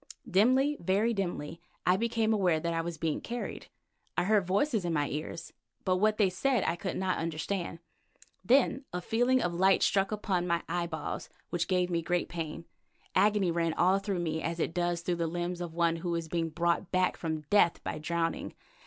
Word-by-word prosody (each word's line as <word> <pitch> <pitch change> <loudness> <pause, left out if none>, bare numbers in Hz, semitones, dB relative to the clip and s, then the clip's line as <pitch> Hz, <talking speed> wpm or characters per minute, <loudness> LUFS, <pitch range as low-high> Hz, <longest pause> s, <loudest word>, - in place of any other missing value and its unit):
Dimly, 255 +9 +3
very 200 +7 +1
dimly, 170 -5 -3 0.2
I 180 - +5
became 225 +1 +1
aware 180 -6 +2
that 170 +1 -2
I 165 - 0
was 165 0 -5
being 155 -1 -1
carried. 240 +1 -5 0.5
I - - +3
heard 200 -1 +2
voices 210 +3 +1
in 170 -1 -1
my 145 -2 +1
ears, 155 +2 -5 0.3
but 185 -1 +2
what 215 +2 +2
they 205 - +4
said 245 +8 +1
I - - 0
could 180 +1 -4
not 185 -1 0
understand. 165 +2 -3 0.7
Then 270 +2 +3
a 180 - -2
feeling 245 +7 +2
of 175 - -1
light 190 +3 +4
struck 195 0 +2
upon 190 -4 -1
my 170 -1 0
eyeballs 170 -2 -3 0.2
which 175 -1 0
gave 180 -1 +1
me 170 -1 +1
great 175 +1 -1
pain. 165 -1 -5 0.5
Agony 200 -2 +3
ran 165 -1 0
all 185 +2 +4
through 195 -3 -2
me 160 -1 -2
as 170 +1 -3
it 165 - -1
does 175 -1 0
through 175 0 -1
the 170 -1 0
limbs 175 +1 -3
of 170 -2 -5
one 170 -1 +2
who 170 +1 -2
is 165 -1 -3
being 165 0 -1
brought 170 +3 0
back 185 0 +2
from 160 -2 -3
death 205 -5 +4
by - - -4
drowning. 165 +1 -2
175 Hz, 195 wpm, -30 LUFS, 165-200 Hz, 0.7 s, I